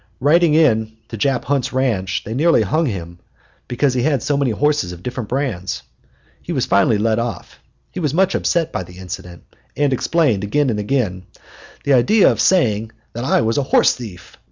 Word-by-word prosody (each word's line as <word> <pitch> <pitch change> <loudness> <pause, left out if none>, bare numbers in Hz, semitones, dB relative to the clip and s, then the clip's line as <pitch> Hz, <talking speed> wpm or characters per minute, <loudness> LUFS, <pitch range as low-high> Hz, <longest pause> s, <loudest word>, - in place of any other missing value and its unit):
Riding 155 +3 +3
into 110 -7 +1
Jap 125 +2 0
Hunt's 140 -1 -1
ranch, 115 -8 -1
they 110 - -6
nearly 150 -2 +3
hung 155 - 0
him 85 -6 -6 0.5
because 130 +2 0
he 125 - 0
had 140 -3 0
so 145 - 0
many 140 -2 +1
horses 145 -4 0
of 90 0 -10
different 125 -3 -5
brands. 120 -10 -3 0.6
He - - -7
was - - 0
finally 100 +2 +3
let 110 +1 +1
off. 115 0 -5 0.3
He - - -6
was 150 -5 0
much 190 +5 +2
upset 165 -2 0
by - - -3
the 90 0 -11
incident, 90 -2 -8 0.3
and 145 -2 +2
explained 130 - +1
again 130 +6 +1
and 105 - -2
again, 105 -5 -2 0.6
"The 140 - +2
idea 160 - +5
of - - -1
saying 115 - +2 0.2
that 120 +2 -4
I - - +2
was 115 +4 0
a - - +2
horse 135 - +3
thief! 105 -7 -11
120 Hz, 185 wpm, -19 LUFS, 105-145 Hz, 0.6 s, idea